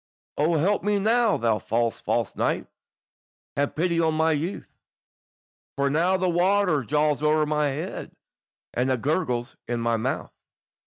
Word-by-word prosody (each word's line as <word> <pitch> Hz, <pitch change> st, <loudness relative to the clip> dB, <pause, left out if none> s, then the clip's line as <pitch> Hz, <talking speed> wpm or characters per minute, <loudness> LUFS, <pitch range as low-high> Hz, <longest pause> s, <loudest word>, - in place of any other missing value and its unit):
"O 160 Hz, +3 st, +2 dB
help 195 Hz, +7 st, +2 dB
me 205 Hz, 0 st, +1 dB
now, 225 Hz, +2 st, +3 dB
thou 115 Hz, -2 st, +1 dB
false, 115 Hz, 0 st, -1 dB
false -, -, -1 dB
knight, -, -, 0 dB, 0.9 s
Have 140 Hz, 0 st, -1 dB
pity 170 Hz, +1 st, +1 dB
on 160 Hz, -1 st, +2 dB
my 160 Hz, +1 st, +3 dB
youth, 160 Hz, +5 st, -3 dB, 1.0 s
For 140 Hz, 0 st, +1 dB
now 175 Hz, +5 st, +2 dB
the 185 Hz, 0 st, 0 dB
water 180 Hz, -3 st, +2 dB
jawes 150 Hz, +3 st, +1 dB
owre 155 Hz, 0 st, +3 dB
my 150 Hz, 0 st, +1 dB
head, 150 Hz, +6 st, -5 dB, 0.6 s
And 125 Hz, +2 st, 0 dB
it 130 Hz, -3 st, -1 dB
gurgles 130 Hz, -5 st, -1 dB
in 120 Hz, 0 st, -2 dB
my 115 Hz, 0 st, +1 dB
mouth." 110 Hz, -, -3 dB
155 Hz, 150 wpm, -25 LUFS, 135-180 Hz, 1.0 s, now